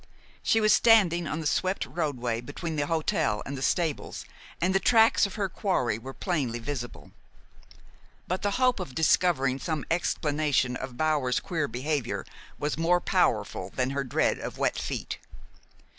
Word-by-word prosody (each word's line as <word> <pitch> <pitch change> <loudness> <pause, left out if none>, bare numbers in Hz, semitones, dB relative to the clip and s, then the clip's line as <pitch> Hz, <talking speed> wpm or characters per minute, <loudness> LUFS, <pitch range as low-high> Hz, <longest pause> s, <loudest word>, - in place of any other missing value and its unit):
She 225 - +3
was 215 -1 +5
standing 180 -7 +5
on 160 +3 -3
the - - -6
swept 185 +6 0
roadway 125 -8 -2
between 160 +6 -5
the 145 -1 -1
hotel 145 -9 0
and 140 - -5
the 130 - -6
stables, 160 +2 -1 0.3
and 185 +2 +1
the 195 - +4
tracks 225 +1 +5
of 195 - -10
her 205 -3 0
quarry 165 - -1
were 130 +3 -8
plainly 135 - -2
visible. 120 0 -6 1.2
But 185 +1 -2
the 205 - +1
hope 255 -3 +3
of 155 -9 -6
discovering 150 -5 +2
some 155 -3 -3
explanation 150 -6 +1
of 130 -1 -6
Bower's 150 -5 +1
queer 155 -5 -2
behavior 135 +3 -2 0.3
was 150 +2 -2
more 175 +2 +3
powerful 95 - 0
than 130 0 0
her 140 0 -1
dread 125 - +1
of - - -6
wet - - 0
feet. - - -4
155 Hz, 160 wpm, -27 LUFS, 130-180 Hz, 1.2 s, was